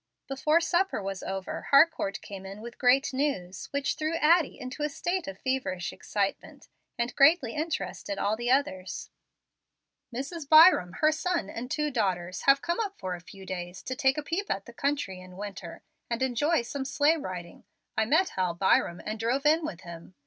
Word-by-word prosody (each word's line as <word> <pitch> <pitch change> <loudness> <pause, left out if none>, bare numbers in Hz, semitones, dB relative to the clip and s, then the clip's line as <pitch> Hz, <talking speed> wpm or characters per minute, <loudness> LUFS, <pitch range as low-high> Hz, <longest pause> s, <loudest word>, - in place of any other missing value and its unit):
Before 300 +4 +2
supper 355 - +1
was 195 -1 -4
over, 190 -1 -5
Harcourt 280 -9 +4
came 195 -2 -9
in 195 +2 -8
with 235 +1 -10
great 265 +2 +3
news, 195 -11 -2
which 280 -1 -1
threw 310 +1 -2
Addie 325 -2 +3
into 255 +2 -7
a 300 - +1
state 350 +5 -2
of 195 - -6
feverish 260 -9 -2
excitement, 200 -2 -3 0.3
and 235 +1 -2
greatly 275 -4 +5
interested 205 - -3
all 205 +2 +1
the 240 +2 -3
others. 250 -9 -1 1.0
"Mrs. 280 +5 -5
Byram, 310 - +7
her 310 0 +5
son, 315 - -1
and 245 +2 -6
two 300 +2 -1
daughters, 185 -7 -1
have 275 0 +6
come 345 +3 -1
up 405 -3 -3
for 185 -2 -4
a 175 - -7
few 190 +2 -13
days 180 0 -6
to 260 - -4
take 270 0 +2
a 300 - -2
peep 350 +7 -3
at 195 0 -2
the 235 - -12
country 235 -9 -2
in 185 0 -13
winter, 195 -4 -7 0.3
and 235 +2 -1
enjoy 265 +3 +1
some 270 +3 -4
sleigh 295 +3 +2
riding. 180 - -7 0.3
I 220 - +2
met 320 +10 +3
Hal 180 -2 -1
Byram, 175 -1 +2
and 215 +1 -4
drove 250 +6 0
in 315 +2 +4
with 190 - -5
him. 170 +1 -11
250 Hz, 185 wpm, -28 LUFS, 195-300 Hz, 1.0 s, Byram